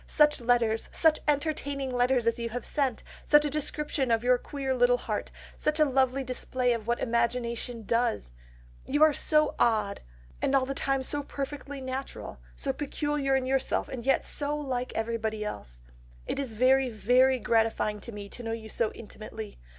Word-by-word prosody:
Such 300 Hz, -3 st, +3 dB
letters, 230 Hz, -2 st, +1 dB
such 320 Hz, -2 st, +4 dB
entertaining 285 Hz, -3 st, -1 dB
letters 245 Hz, 0 st, +2 dB
as 230 Hz, 0 st, +1 dB
you 235 Hz, 0 st, -2 dB
have 245 Hz, +2 st, -4 dB
lately -, -, -4 dB
sent! 270 Hz, -6 st, 0 dB, 0.2 s
such 295 Hz, 0 st, +5 dB
a 295 Hz, -, -1 dB
description 300 Hz, -2 st, -2 dB
of 230 Hz, 0 st, +2 dB
your 250 Hz, 0 st, +4 dB
queer 270 Hz, -1 st, -3 dB
little 245 Hz, -1 st, +4 dB
heart! -, -, -3 dB, 0.3 s
such 305 Hz, +1 st, -1 dB
a 305 Hz, -, +6 dB
lovely 265 Hz, -1 st, +2 dB
display 255 Hz, -1 st, 0 dB
of 225 Hz, -2 st, -5 dB
what 235 Hz, 0 st, +1 dB
imagination 235 Hz, 0 st, -1 dB
does!... 230 Hz, -, 0 dB, 0.6 s
You 290 Hz, +3 st, +3 dB
are 310 Hz, -1 st, +6 dB
so 305 Hz, +1 st, +2 dB
odd, 215 Hz, -4 st, +2 dB, 0.4 s
and 275 Hz, -, +2 dB
all 265 Hz, -1 st, +3 dB
the 275 Hz, -, -3 dB
time 270 Hz, -1 st, 0 dB
so 290 Hz, +2 st, 0 dB
perfectly 280 Hz, 0 st, -6 dB
natural, 260 Hz, -, -6 dB, 0.2 s
so -, -, -2 dB
peculiar 290 Hz, -1 st, -1 dB
in 265 Hz, -1 st, +1 dB
yourself, 265 Hz, 0 st, 0 dB
and 250 Hz, -3 st, -6 dB
yet 270 Hz, +2 st, +2 dB
so 295 Hz, 0 st, -1 dB
like 255 Hz, -4 st, -3 dB
everybody 220 Hz, -1 st, -2 dB
else. -, -, -7 dB, 0.4 s
It -, -, -3 dB
is 265 Hz, -5 st, -3 dB
very, 260 Hz, +3 st, +4 dB
very 250 Hz, +4 st, +3 dB
gratifying 225 Hz, -3 st, +1 dB
to 235 Hz, -, -8 dB
me 205 Hz, -2 st, -7 dB
to 245 Hz, -, -8 dB
know 225 Hz, -1 st, -3 dB
you 220 Hz, -1 st, -6 dB
so 225 Hz, -1 st, 0 dB
intimately.... 215 Hz, -1 st, -9 dB
250 Hz, 180 wpm, -28 LUFS, 230-275 Hz, 0.6 s, a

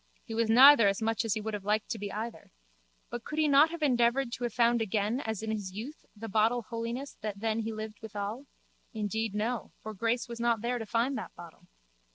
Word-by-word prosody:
He 225 Hz, -, -7 dB
was 225 Hz, 0 st, 0 dB
neither 255 Hz, -1 st, +8 dB
as 195 Hz, 0 st, +1 dB
much 225 Hz, +1 st, 0 dB
as 225 Hz, -2 st, 0 dB
he 215 Hz, -, -2 dB
would 220 Hz, +1 st, -4 dB
have 205 Hz, -2 st, -4 dB
liked 210 Hz, +1 st, 0 dB
to 225 Hz, -, -3 dB
be 205 Hz, 0 st, -5 dB
either. 225 Hz, +2 st, -6 dB, 0.6 s
But 240 Hz, -1 st, -5 dB
could 305 Hz, -, -6 dB
he 310 Hz, -1 st, +3 dB
not 290 Hz, +2 st, +6 dB
have 335 Hz, -1 st, -5 dB
endeavoured 240 Hz, -1 st, +2 dB
to 245 Hz, -, -5 dB
have 240 Hz, -, -2 dB
found 235 Hz, -1 st, +3 dB
again 215 Hz, +3 st, 0 dB
as 220 Hz, -5 st, -4 dB
in 220 Hz, -, -2 dB
his 205 Hz, -4 st, -4 dB
youth 240 Hz, +10 st, -8 dB
the 225 Hz, +2 st, -7 dB
bottle 225 Hz, +3 st, +2 dB
Holiness 235 Hz, +4 st, -5 dB
that 210 Hz, -2 st, -4 dB
then 220 Hz, +1 st, 0 dB
he 225 Hz, 0 st, -2 dB
lived 215 Hz, -1 st, -7 dB
withal? 215 Hz, +4 st, -5 dB, 0.5 s
Indeed 220 Hz, 0 st, -2 dB
no 225 Hz, +2 st, -2 dB
for 220 Hz, -, -7 dB
Grace 230 Hz, +4 st, -1 dB
was 235 Hz, 0 st, -7 dB
not 235 Hz, -2 st, +1 dB
there 245 Hz, +1 st, -1 dB
to 225 Hz, -, -6 dB
find 240 Hz, +5 st, 0 dB
that -, -, -9 dB
bottle. 175 Hz, +1 st, -13 dB
225 Hz, 225 wpm, -30 LUFS, 215-240 Hz, 0.6 s, neither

